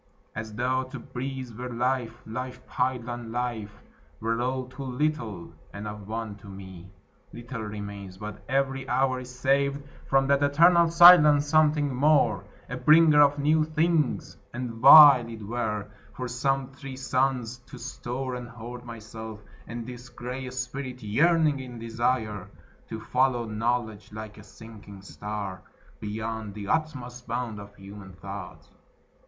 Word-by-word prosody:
As 110 -1 -6
tho' 130 +2 0
to 130 +1 -8
breathe 130 0 -6
were 125 +2 -6
life! 120 -1 -2
Life 125 +2 -6
piled 125 -1 -1
on 120 -1 -6
life 115 -4 -4 0.4
Were 115 +1 -1
all 130 +1 -1
too 130 +2 -11
little, 125 - -3 0.2
and 100 +1 -7
of 105 -1 -8
one 110 -1 -5
to 105 - -15
me 95 -2 -10 0.4
Little 120 0 -7
remains: 100 -3 -7
but 105 +1 -8
every 135 0 -1
hour 130 -1 +1
is 125 0 -9
saved 140 +2 0 0.2
From 135 0 +3
that 140 +1 +2
eternal 170 +4 +5
silence, 165 -4 +8
something 150 -2 +3
more, 130 -8 +3 0.2
A 125 - -5
bringer 155 +1 +6
of 145 0 +4
new 155 +2 +3
things; 155 -1 0 0.2
and 125 -1 -4
vile 130 +1 +9
it 110 -2 -8
were 105 -2 -2 0.3
For 125 - -4
some 135 +2 -1
three 135 -1 -9
suns 130 -2 -1
to - - -11
store 130 +1 -5
and 125 -1 -6
hoard 120 +1 -9
myself, 110 -2 -9 0.3
And 115 +1 -6
this 125 0 -9
gray 125 +2 -6
spirit 130 0 -5
yearning 150 +6 +3
in 125 -2 -8
desire 115 -3 -2 0.4
To 110 - -5
follow 120 +1 +1
knowledge 110 -1 -2
like 110 0 -8
a - - -12
sinking 105 -2 -13
star, 100 -2 -6 0.4
Beyond 110 0 -5
the 100 -1 -6
utmost 125 -6 -2
bound 120 -2 -3
of 100 0 -12
human 100 -1 -11
thought. 95 0 -9
125 Hz, 145 wpm, -27 LUFS, 110-135 Hz, 0.4 s, vile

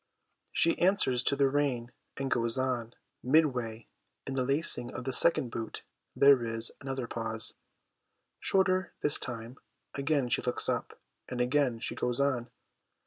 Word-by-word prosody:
She 165 - +2
answers 175 -10 +3
to 140 - +3
the 140 -1 +3
rein 135 -4 -1 0.3
and 135 -1 -3
goes 115 +1 0
on; 125 -3 -2 0.3
midway, 125 -6 +1 0.4
in 135 - -4
the 130 -1 0
lacing 135 -2 +2
of 125 - -5
the 130 +1 -3
second 130 -5 +5
boot, 115 -1 -6 0.3
there 140 -3 +5
is 115 0 +1
another 135 -2 -4
pause, 115 -1 -1 0.9
shorter 185 -1 +1
this 150 - +4
time; 120 0 -5 0.3
again 140 -2 0
she - - +1
looks 125 - -2
up, - - -3 0.3
and 125 - -5
again 125 -1 +1
she - - -5
goes 125 0 -2
on. 130 -4 0
130 Hz, 145 wpm, -30 LUFS, 120-140 Hz, 0.9 s, second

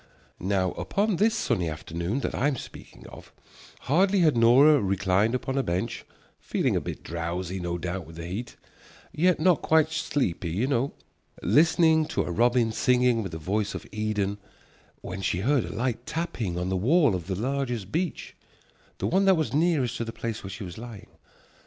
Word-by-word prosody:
Now 95 -1 0
upon 205 -2 -1
this 220 +4 +3
sunny 100 - 0
afternoon 85 - -3
that - - -2
I 135 - +1
am 145 - 0
speaking - - -11
of, - - -13 0.5
hardly 190 +6 +3
had 155 -5 +4
Nora 130 +5 +6
reclined 100 +3 +1
upon 130 +1 -3
her - - +3
bench, 95 +1 -3 0.3
feeling - - 0
a - - +1
bit - - -6
drowsy 85 +3 -4
no 85 -1 -3
doubt 90 +1 -4
with 80 - -12
the 85 0 -7
heat, 105 +8 -5 0.6
yet 180 +2 +2
not 175 0 +3
quite 160 0 +3
sleepy 130 - -1
you 95 +10 0
know, 135 0 0 0.5
listening 160 0 +4
to - - -1
a - - -4
robin 120 +3 +2
singing 125 0 +2
with 95 -5 -5
the 80 - -5
voice 100 +6 -2
of - - -6
Eden, 105 -1 -2 0.6
when 95 +1 -6
she 90 -1 -1
heard 135 +3 +2
a - - -6
light 120 0 -2
tapping 140 - -3
on 90 +1 -2
the 95 - 0
wall 140 - +3
of 90 -2 -4
the 95 - -2
largest 120 -3 -2
beech, 175 +1 -3 0.6
the - - -3
one 190 +3 +2
that 190 -2 +5
was 155 -3 -1
nearest 155 -5 +1
to - - -2
the 115 - -5
place 115 -1 -5
where 95 - -6
she 100 +2 -7
was 90 +2 -8
lying. 115 -4 -10
115 Hz, 185 wpm, -26 LUFS, 95-145 Hz, 0.6 s, Nora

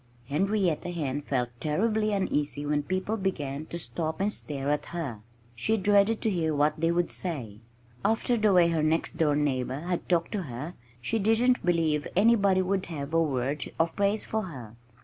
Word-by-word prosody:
Henrietta 180 +1 +1
Hen 145 -5 -2
felt 125 -4 -1
terribly 215 +7 +1
uneasy 150 -7 -1
when 145 0 +1
people 185 +7 -2
began 155 -7 -3
to 170 - -5
stop 155 +3 -3
and 205 +2 +1
stare 140 -1 -3
at 150 - -1
her. 150 -11 -4 0.4
She 220 - +1
dreaded 205 +2 +3
to 220 - +2
hear 160 -4 0
what 150 +2 +2
they 165 +1 +2
would 175 0 0
say. 125 - -4 0.4
After 225 +2 +2
the 215 -2 +3
way 175 -2 +5
her 165 -2 +1
next 155 +2 0
door 150 -3 +3
neighbors 135 -1 -1
had 180 0 -3
talked 170 -2 +1
to 210 - -1
her 145 +2 -6 0.3
she 225 - 0
didn't 225 +4 +3
believe 160 -4 +1
anybody 200 -2 +4
would 190 0 -1
have 150 -2 -5
a 165 - +4
word 140 -1 -1
of 165 0 +1
praise 205 +1 +1
for 220 - -1
her. 125 -10 -9
165 Hz, 180 wpm, -28 LUFS, 145-195 Hz, 0.4 s, way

